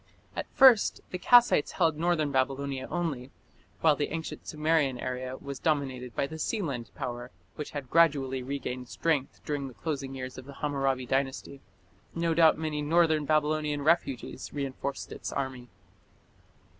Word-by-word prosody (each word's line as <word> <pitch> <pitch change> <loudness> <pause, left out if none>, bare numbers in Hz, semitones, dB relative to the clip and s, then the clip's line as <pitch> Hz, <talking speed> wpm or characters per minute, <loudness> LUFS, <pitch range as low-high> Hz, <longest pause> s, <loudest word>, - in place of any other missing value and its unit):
At - - -3
first 260 -6 +6
the 180 - -4
Kassites 240 -8 +5
held 165 -4 +2
northern 160 -2 +1
Babylonia 135 0 -1
only, 155 -8 -2 0.5
while 155 -2 +5
the 145 - -2
ancient 160 0 -5
Sumerian 155 -4 +1
area 130 +1 -4
was 140 -1 -7
dominated 135 -6 -1
by - - +1
the 160 +3 -7
Sealand 150 - -2
power, 120 0 -5 0.2
which 150 - -6
had 145 -3 -6
gradually 140 -6 +3
regained 125 -1 -5
strength 150 -5 -1
during 145 -2 -2
the 130 - -11
closing 135 -4 -4
years 130 0 -6
of 130 - -11
the 140 - -10
Hammurabi 135 -3 -1
Dynasty. 135 +1 -2 0.5
No 170 0 +1
doubt 160 -1 +5
many 155 -1 -2
northern 155 0 +3
Babylonian 150 -1 +1
refugees 140 -5 0
reinforced 140 -1 -4
its - - -6
army. 130 -3 -4
140 Hz, 145 wpm, -29 LUFS, 130-160 Hz, 0.5 s, first